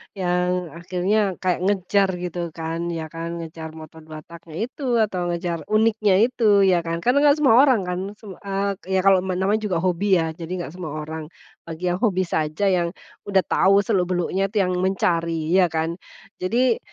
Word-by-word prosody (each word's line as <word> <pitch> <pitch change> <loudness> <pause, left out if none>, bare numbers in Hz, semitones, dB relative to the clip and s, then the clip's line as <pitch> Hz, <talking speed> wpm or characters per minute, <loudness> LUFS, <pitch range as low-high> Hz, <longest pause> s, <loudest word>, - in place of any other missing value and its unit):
yang 180 -1 -1
akhirnya 185 +2 0
kayak 180 -2 +1
ngejar 200 0 +2 0.2
gitu 175 0 -4 0.2
kan, 165 +1 -4
ya 160 -2 -5
kan, 165 +1 -5
ngejar 160 0 -8
motor 160 0 -11
2-tak-nya 160 +1 -11
itu, 250 0 -2
atau 180 -4 -2
ngejar 170 -2 -3
uniknya 215 -2 +2
itu 220 -5 +3
ya 185 -2 +4
kan, 165 0 -3
karena 250 +3 +3
enggak 290 +1 +5
semua 230 -5 +6
orang 260 -6 +5
kan, 180 0 -2 0.2
sem 210 -1 -12
eee, 195 -1 -3
ya - - +3
kalau 195 -1 +6
me 185 - -1
namanya 195 +4 +1
juga 185 -4 -1
hobi 190 +2 +2
ya, 165 -2 0
jadi 165 +1 -7
enggak 175 -5 -5
semua 175 -3 -7
orang, 155 0 -7 0.4
bagi 165 +1 -8
yang 180 - -2
hobi 190 -5 +1
saja 155 0 -2
yang 175 0 0 0.3
udah 195 -2 +3
tahu 195 +1 +3
seluk 190 -4 +1
beluknya 185 +2 0
itu 200 0 +1
yang 180 - -1
mencari 170 -4 0
ya 185 0 +5
kan. 165 +1 -3 0.4
Jadi 235 +6 +1
180 Hz, 180 wpm, -22 LUFS, 170-200 Hz, 0.4 s, semua